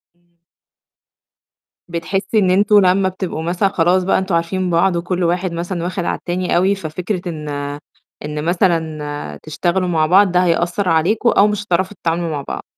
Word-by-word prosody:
إمم. 175 Hz, 0 st, -40 dB, 1.5 s
بتحسّي 190 Hz, +5 st, -1 dB
إن 185 Hz, -2 st, +2 dB
أنتم 205 Hz, +2 st, +5 dB
لمّا 190 Hz, +1 st, +3 dB
بتبقوا 185 Hz, -4 st, -5 dB
مثلًا 175 Hz, +4 st, +1 dB
خلاص 180 Hz, 0 st, +2 dB
بقى 190 Hz, -, +2 dB
أنتم 190 Hz, -2 st, -1 dB
عارفين 180 Hz, +2 st, -1 dB
بعض 175 Hz, +1 st, +2 dB
وكلّ 175 Hz, +1 st, -2 dB
واحد 175 Hz, +1 st, 0 dB
مثلًا 170 Hz, +1 st, -3 dB
واخد 180 Hz, 0 st, -3 dB
على -, -, -1 dB
التاني 180 Hz, +1 st, -2 dB
أوي 190 Hz, +3 st, +3 dB
ففكرة 180 Hz, +2 st, -4 dB
إن 155 Hz, -3 st, -6 dB, 0.8 s
إن 150 Hz, +1 st, -4 dB
مثلًا 155 Hz, -, -1 dB
تشتغلوا 175 Hz, +4 st, -1 dB
مع 160 Hz, -3 st, +2 dB
بعض 185 Hz, +3 st, +4 dB
ده 180 Hz, 0 st, +3 dB
هيأثّر 175 Hz, +3 st, 0 dB
عليكم 185 Hz, +9 st, +2 dB
أو 205 Hz, -, +4 dB
مش 210 Hz, -1 st, -2 dB
هتعرفوا 185 Hz, +1 st, -1 dB
تتعاملوا 170 Hz, 0 st, -1 dB
مع 150 Hz, -3 st, -3 dB
بعض. -, -, -5 dB
175 Hz, 165 wpm, -18 LUFS, 165-190 Hz, 1.5 s, أنتم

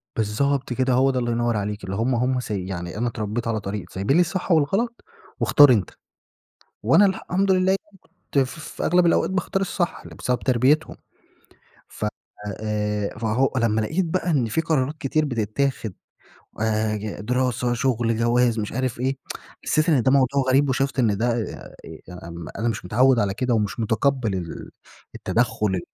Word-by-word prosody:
بالضبط 125 Hz, +5 st, 0 dB
كده، 130 Hz, +1 st, +1 dB
هو 135 Hz, +2 st, +4 dB
ده 130 Hz, -, -1 dB
الله 120 Hz, -1 st, -1 dB
ينور 120 Hz, -1 st, 0 dB
عليكِ، 105 Hz, +1 st, -3 dB
اللي 95 Hz, -, -4 dB
هم 120 Hz, +5 st, +1 dB
هم 125 Hz, +2 st, +1 dB
سي 105 Hz, -6 st, -4 dB
يعني 85 Hz, -1 st, -5 dB
أنا 120 Hz, +3 st, 0 dB
اتربيت 110 Hz, 0 st, -3 dB
على 115 Hz, -1 st, 0 dB
طريق 100 Hz, -1 st, -5 dB
سايبين 100 Hz, +9 st, 0 dB
لي -, -, +6 dB
الصح 180 Hz, +2 st, -2 dB
والغلط، 195 Hz, +10 st, +1 dB, 0.4 s
واختار 145 Hz, -3 st, +7 dB
أنتَ، 105 Hz, -7 st, +2 dB, 0.9 s
وأنا 135 Hz, -, +5 dB
الحمد 190 Hz, 0 st, 0 dB
لله 185 Hz, 0 st, +3 dB
يعنى 200 Hz, -2 st, -23 dB, 0.4 s
كنت 140 Hz, -, +4 dB
ف 135 Hz, +3 st, -1 dB
في 160 Hz, -, -5 dB
أغلب 175 Hz, +1 st, +4 dB
الأوقات 170 Hz, -, +3 dB
باختار 190 Hz, +1 st, -1 dB
الصح، 185 Hz, -2 st, -2 dB
بسبب 125 Hz, -1 st, -2 dB
تربيتهم 130 Hz, +5 st, +2 dB, 0.9 s
ف -, -, -5 dB, 0.6 s
آآ 105 Hz, -1 st, -2 dB
فهو 115 Hz, +4 st, +1 dB
لمّا 110 Hz, -3 st, +2 dB
لقيت 160 Hz, -, 0 dB
بقى 180 Hz, +2 st, -1 dB
إن 140 Hz, -7 st, +2 dB
في 115 Hz, +9 st, 0 dB
قرارات 150 Hz, -2 st, 0 dB
كتير 155 Hz, +2 st, 0 dB
بتتاخد، 115 Hz, -2 st, -1 dB, 0.7 s
آآ، 110 Hz, 0 st, +1 dB
ي 105 Hz, 0 st, -5 dB
دراسة، 125 Hz, +1 st, 0 dB
شغل، 120 Hz, -2 st, 0 dB
جواز، 120 Hz, 0 st, +2 dB
مش 105 Hz, -1 st, -3 dB
عارف 130 Hz, -1 st, -2 dB
إيه. 135 Hz, +2 st, 0 dB, 0.5 s
حسيت 155 Hz, +2 st, +1 dB
إن 145 Hz, -7 st, +4 dB
ده 130 Hz, -, +3 dB
موضوع 140 Hz, 0 st, +3 dB
غريب 140 Hz, +2 st, +4 dB
وشُفت 135 Hz, +1 st, 0 dB
إن 110 Hz, -5 st, +3 dB
ده 115 Hz, +4 st, 0 dB
آآ، 115 Hz, -2 st, -5 dB, 0.6 s
آمم، 85 Hz, -1 st, -8 dB
أنا 115 Hz, -, 0 dB
مش 110 Hz, -5 st, -3 dB
متعوّد 125 Hz, +7 st, +3 dB
على 100 Hz, -3 st, +1 dB
كده 125 Hz, +2 st, 0 dB
ومش 105 Hz, 0 st, -1 dB
متقبل 115 Hz, 0 st, +1 dB
ال 85 Hz, -3 st, -6 dB, 0.4 s
التدخل 110 Hz, -5 st, 0 dB
120 Hz, 170 wpm, -23 LUFS, 110-140 Hz, 0.9 s, واختار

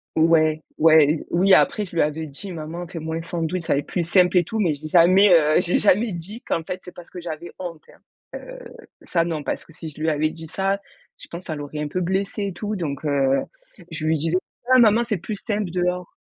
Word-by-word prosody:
Ouais. 155 Hz, -1 st, +3 dB
Ouais. 155 Hz, -2 st, +6 dB
Z -, -, -10 dB
oui, 190 Hz, +3 st, +4 dB
après 210 Hz, -, +4 dB
je 195 Hz, -, -9 dB
lui 170 Hz, -, +1 dB
avais 155 Hz, +2 st, -1 dB
dit: 170 Hz, +8 st, -9 dB
«Maman 165 Hz, +2 st, -6 dB
fait 170 Hz, -1 st, -7 dB
moins 160 Hz, +1 st, -4 dB
un -, -, -4 dB
sandwich, 170 Hz, +1 st, -3 dB
ça -, -, +1 dB
va 140 Hz, -, +2 dB
être 145 Hz, -, -6 dB
plus 175 Hz, -, -1 dB
simple 180 Hz, +1 st, +4 dB
et 175 Hz, -, +5 dB
tout». 225 Hz, -, -4 dB
Mais 170 Hz, -6 st, +2 dB
j'ai 150 Hz, +2 st, -8 dB
jamais, 185 Hz, +5 st, +6 dB
heu, 155 Hz, -2 st, +5 dB
j'ai 180 Hz, -1 st, +1 dB
jamais 210 Hz, +1 st, +3 dB
dit, 190 Hz, +7 st, -8 dB
qu'en 165 Hz, -10 st, -2 dB
fait 185 Hz, +3 st, -6 dB
c'est 180 Hz, -, -10 dB
parce 175 Hz, -, -13 dB
que 180 Hz, -, -9 dB
j'avais 170 Hz, 0 st, -7 dB
honte, 170 Hz, -4 st, -7 dB
hein, -, -, -22 dB, 0.4 s
heu, -, -, -10 dB, 0.4 s
ça 170 Hz, -2 st, 0 dB
non, 160 Hz, -3 st, -3 dB
parce -, -, -4 dB
que 165 Hz, -, -18 dB
si 160 Hz, 0 st, -8 dB
je 150 Hz, -, -14 dB
lui 160 Hz, +1 st, +1 dB
avais 155 Hz, 0 st, +1 dB
dit 160 Hz, 0 st, -9 dB
ça, 195 Hz, +3 st, -1 dB, 0.4 s
je -, -, -12 dB
pense 170 Hz, +2 st, -8 dB
ça 155 Hz, -, -4 dB
l'aurait 145 Hz, 0 st, -6 dB
un 150 Hz, -, -3 dB
peu 185 Hz, -, -2 dB
blessée 190 Hz, +3 st, -1 dB
et 195 Hz, -, -5 dB
tout. 210 Hz, +4 st, -4 dB
Donc, 150 Hz, -6 st, -4 dB
heu, 135 Hz, -2 st, +2 dB, 0.5 s
je 155 Hz, -, -4 dB
lui 160 Hz, 0 st, +2 dB
disais: 165 Hz, +4 st, 0 dB, 0.4 s
«Ah 255 Hz, -, +7 dB
maman, 230 Hz, 0 st, +5 dB
c'est 215 Hz, -4 st, 0 dB
plus 210 Hz, +5 st, -5 dB
simple 205 Hz, -1 st, -3 dB
dehors». 180 Hz, 0 st, -2 dB
170 Hz, 245 wpm, -22 LUFS, 155-185 Hz, 0.5 s, Ah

